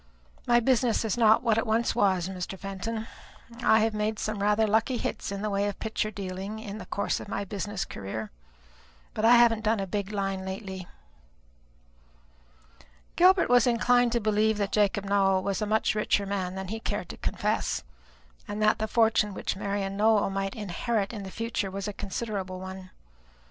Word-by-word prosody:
My 240 0 +5
business 240 -2 +2
is 220 - 0
not 220 0 +5
what 225 -2 +3
it 225 - -2
once 225 +2 +1
was, 190 -6 +2
Mr. 190 0 -5
Fenton. 200 +4 -4 0.6
I 220 -1 +5
have 220 0 +1
made 210 +1 -1
some 215 -2 -3
rather 210 +2 +3
lucky 225 +4 +1
hits - - -3
in 200 +1 -4
the 215 - 0
way 200 +1 +1
of 205 - -4
picture 220 -1 -2
dealing 195 +1 -5
in 215 -1 -7
the - - -9
course 200 - -1
of - - -9
my 200 0 -3
business 200 -1 -3
career, 105 +2 -6 0.8
but 215 - -1
I 240 +2 +8
haven't 235 -2 +5
done 220 0 +2
a 195 - -1
big 200 +1 -3
line 195 -2 -2
lately." 190 -1 -6 2.3
Gilbert 365 +1 +5
was 245 +1 +5
inclined 245 0 +3
to 235 - +2
believe 215 0 +2
that 200 -1 -1
Jacob 205 -1 +1
Nowell 195 -1 +2
was 195 0 -1
a 210 - -1
much 220 +1 +2
richer 210 -1 +1
man 190 -2 -3
than 190 -1 -5
he 220 +2 -4
cared - - -4
to - - -8
confess, - - -1 0.6
and 205 0 -4
that 215 +1 +3
the 220 - -1
fortune 220 -3 +2
which - - -2
Marian 195 0 -3
Nowell 210 -1 +3
might 195 0 -2
inherit 210 +1 -2
in 210 - -5
the 195 - -7
future 225 -1 -3
was 195 +2 -5
a 205 - -4
considerable 195 -2 -4
one. 190 0 -8
210 Hz, 185 wpm, -27 LUFS, 195-220 Hz, 2.3 s, I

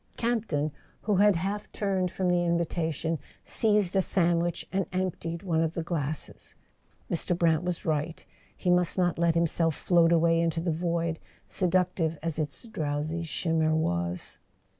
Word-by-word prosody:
Campton, 215 -11 0 0.3
who 210 -3 +1
had 205 0 +5
half 200 +5 -3
turned 190 -3 0
from 185 +1 -2
the 175 0 +3
invitation, 165 -2 -1 0.2
seized 210 -4 +2
a 190 - +5
sandwich 175 -2 +1
and 195 -1 0
emptied 180 -2 -3
one 165 -4 +1
of 165 0 -1
the 165 - -2
glasses. 155 -3 -4 0.5
Mr. 175 +1 0
Brant 165 -3 +3
was 180 -1 -3
right; 155 +1 -2 0.3
he 180 - +1
must 180 0 +2
not 175 -2 +1
let 170 -1 +3
himself 165 -1 +1
float 170 -2 +3
away 165 0 +4
into 165 0 0
the 170 +1 0
void, 170 0 -1 0.3
seductive 180 -3 +1
as 165 -1 -1
its 150 -2 -4
drowsy 155 -3 -2
shimmer 160 -1 0
was. 85 - -1
170 Hz, 150 wpm, -28 LUFS, 160-180 Hz, 0.5 s, had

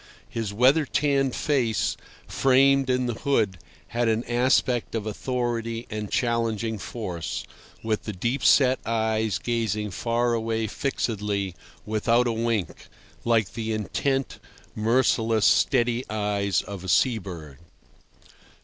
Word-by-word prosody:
His 115 -3 -3
weather 130 +9 +4
tanned 140 -3 +1
face, 125 -8 0 0.3
framed 135 0 +3
in 125 0 +1
the 120 - -1
hood, 110 - 0 0.3
had 120 0 0
an 110 +1 +1
aspect 120 0 +1
of 110 -2 -2
authority 115 0 -2
and 105 -1 -4
challenging 115 -2 -1
force, 90 -7 -5 0.4
with 110 -1 -1
the 105 - -3
deep 115 +7 -2
set 130 -2 +5
eyes 110 -3 0
gazing 105 -1 -2
far 120 +5 0
away 115 -1 -1
fixedly, 105 -5 -2 0.3
without 115 +3 +2
a 120 - +1
wink, 115 -4 -2 0.4
like 115 -4 +1
the 110 -1 -3
intent, 135 +5 -1 0.3
merciless, 115 -1 +2
steady 120 -1 +3
eyes 105 -2 0
of 100 -3 -8
a 95 - -5
sea 120 +5 +3
bird. 80 -8 -9
115 Hz, 120 wpm, -25 LUFS, 105-125 Hz, 0.4 s, set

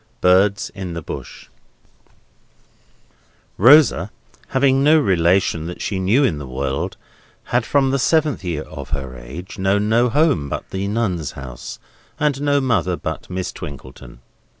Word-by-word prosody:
BIRDS 95 +3 +3
IN 95 -4 -6
THE 85 - -5
BUSH - - -8 2.1
Rosa, 120 - +6 0.4
having 135 0 +2
no 155 +2 +6
relation 90 - +2
that 90 - -7
she 95 - -2
knew 100 +9 +3
of 140 - +4
in 80 - -2
the 70 - -7
world, 65 +1 -3 0.6
had, 120 -1 +2
from 135 -2 +2
the 135 - +1
seventh 155 -4 +1
year 85 -4 -3
of 70 -3 -9
her 65 -2 -7
age, 70 +12 -9
known 100 +2 +1
no 120 +2 +3
home 135 - +2
but - - -5
the 95 +1 -2
Nuns' 100 -8 -2
House, 65 -3 -8 0.4
and 145 -2 0
no 145 -1 +2
mother 110 -9 +1
but 80 - -6
Miss 90 0 -3
Twinkleton. 65 -3 -10
95 Hz, 150 wpm, -20 LUFS, 80-130 Hz, 2.1 s, Rosa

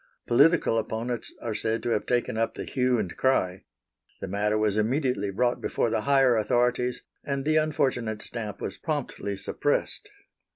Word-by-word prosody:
Political 140 -2 +4
opponents 115 +2 -3
are 115 - -2
said 110 +2 -1
to - - -1
have 110 - 0
taken 120 -2 0
up 115 +1 0
the - - -5
hue 125 -1 +1
and 95 -6 -3
cry. 95 -9 +1 0.5
The - - -5
matter 105 +2 0
was 105 -2 +1
immediately 115 -2 0
brought 120 +5 0
before 115 - 0
the 110 - +1
higher 135 -3 +5
authorities, 125 +3 +1 0.2
and 140 -1 -2
the 155 +1 +3
unfortunate 125 -8 0
stamp 110 -4 -6
was - - -5
promptly 140 - -3
suppressed. 145 - -1
120 Hz, 160 wpm, -27 LUFS, 105-130 Hz, 0.5 s, higher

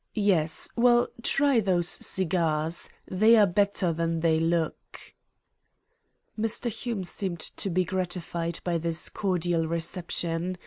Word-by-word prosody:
Yes. 185 -7 +1
Well, 240 0 +4
try 275 0 +2
those 180 -5 +1
cigarettes. 165 -3 0 0.2
They 215 +5 +5
are 215 -2 +6
better 195 -2 +1
than 165 0 -1
they 160 -1 +3
look." 165 0 -1 1.4
Mr. 225 +2 -1
Hume 220 -2 -4
seemed 180 -1 -4
to 195 - -3
be 185 +1 +1
gratified 175 -2 -3
by 170 -2 0
this 165 0 -1
cordial 175 -4 0
reception. 170 +1 -2
175 Hz, 120 wpm, -27 LUFS, 165-200 Hz, 1.4 s, are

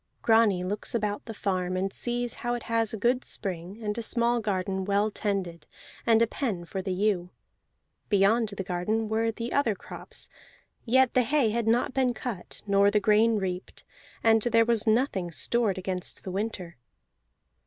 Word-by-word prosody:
Grani 220 -5 +4
looks 205 +6 -3
about 210 -2 -2
the 225 - -6
farm, 185 -2 -1
and 195 +1 -2
sees 240 -1 -1
how 240 0 -1
it 240 - -6
has 230 -2 0
a 220 - -3
good 245 +4 +1
spring, 185 0 -3
and 210 -1 -2
a 235 - -3
small 235 +1 +1
garden 190 -3 -2
well 200 +2 +1
tended, 185 -7 -3 0.4
and 230 0 +5
a - - +5
pen 215 -8 -3
for 190 +3 -4
the 190 0 -3
ewe. 185 -2 0 0.8
Beyond 210 +3 +3
the 200 -1 -5
garden 205 +5 -1
were 225 +1 +1
the 230 +2 -4
other 240 -7 +2
crops; - - -7 0.6
yet 260 +1 +4
the 255 - +4
hay 260 -2 +2
had 230 0 -1
not 240 +3 +2
been 255 -2 +1
cut, 220 -8 -6
nor 200 0 +4
the 210 +1 +2
grain 215 +2 +4
reaped, 185 -2 -5 0.4
and 225 -1 +5
there 230 0 +3
was 230 -2 +1
nothing 220 -6 +1
stored 210 +4 +1
against 185 -1 -2
the 185 - -5
winter. 190 -4 -4
215 Hz, 175 wpm, -27 LUFS, 190-230 Hz, 0.8 s, and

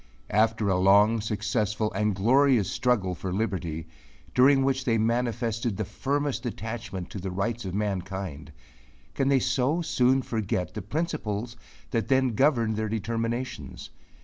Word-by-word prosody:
After 110 0 +2
a 95 -2 +2
long, 105 +4 +5
successful, 110 0 -1
and 105 -2 0
glorious 120 +1 +4
struggle 110 -8 +1
for 90 +2 -5
liberty, 90 -6 -2 0.5
during 135 +2 +5
which 135 0 +1
they 115 -3 +2
manifested 115 -1 0
the 110 - -2
firmest 140 +2 -2
attachment 110 -5 -5
to 100 - -5
the 95 +1 -4
rights 110 +5 -2
of 95 0 -4
mankind, 95 -7 -3 0.6
can 135 - 0
they 140 -1 +4
so 130 +7 +1
soon 130 -3 +2
forget 95 -8 -2
the 105 - -4
principles 120 - -3 0.4
that 115 -3 0
then 130 -1 +3
governed 115 -2 +2
their 110 -1 -1
determinations? 115 - -3
110 Hz, 140 wpm, -27 LUFS, 100-125 Hz, 0.6 s, long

